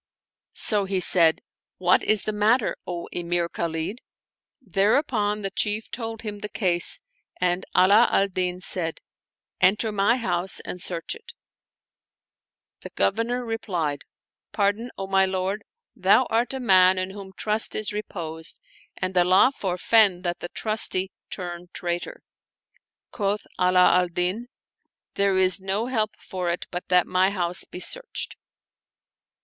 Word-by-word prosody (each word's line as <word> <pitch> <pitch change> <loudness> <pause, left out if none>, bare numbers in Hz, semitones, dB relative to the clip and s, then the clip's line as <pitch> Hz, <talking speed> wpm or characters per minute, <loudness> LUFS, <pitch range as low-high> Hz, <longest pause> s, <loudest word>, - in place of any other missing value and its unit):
So 205 -3 +3
he 190 -1 -1
said, 170 -3 +5 0.2
" - - -69
What 180 - +5
is 215 -2 +1
the 215 - -2
matter, 215 +3 +2
O 175 -1 -5
Emir 175 0 -1
Khalid?" 170 +7 -4 0.6
Thereupon 210 -2 0
the 195 - -3
Chief 215 +1 -1
told 225 -1 -6
him 210 -2 -5
the 210 - -6
case 175 -6 +1 0.4
and 180 0 0
Ala 200 +6 +6
al 195 - +2
Din 180 -1 -3
said, 170 -3 -2 0.3
" - - -38
Enter 210 +4 +3
my 210 +4 +2
house 185 -5 0
and 180 - -7
search 175 - -5
it" 465 +1 -13 1.5
The - - -8
Governor 235 +4 -1
replied, 175 -10 -3 0.3
" - - -69
Pardon, 210 +3 0
O 195 - -4
my 190 0 +2
lord; 190 +2 -2 0.3
thou - - +4
art 235 +4 0
a - - -4
man 190 -5 +5
in 185 +1 -2
whom 195 -1 -9
trust 215 +1 +3
is 215 -1 -2
reposed 165 -6 -4 0.4
and 185 0 -3
Allah 185 +7 +5
forfend 190 0 +2
that 175 0 -2
the 175 - -6
trusty 195 -3 -1 0.2
turn 175 -2 -6
traitor! 175 0 -4 0.4
" - - -44
Quoth 205 -1 -2
Ala 180 0 +5
al 180 - +1
Din, 180 +7 -2 0.3
" - - -58
There 200 -1 +2
is 185 +1 +4
no 195 +4 -1
help 220 -4 -1
for 180 -2 -4
it 170 - -3
but 180 0 -5
that 180 -1 +4
my 185 +1 +2
house 180 -3 -1
be - - -9
searched." - - -2
190 Hz, 150 wpm, -24 LUFS, 180-215 Hz, 1.5 s, Ala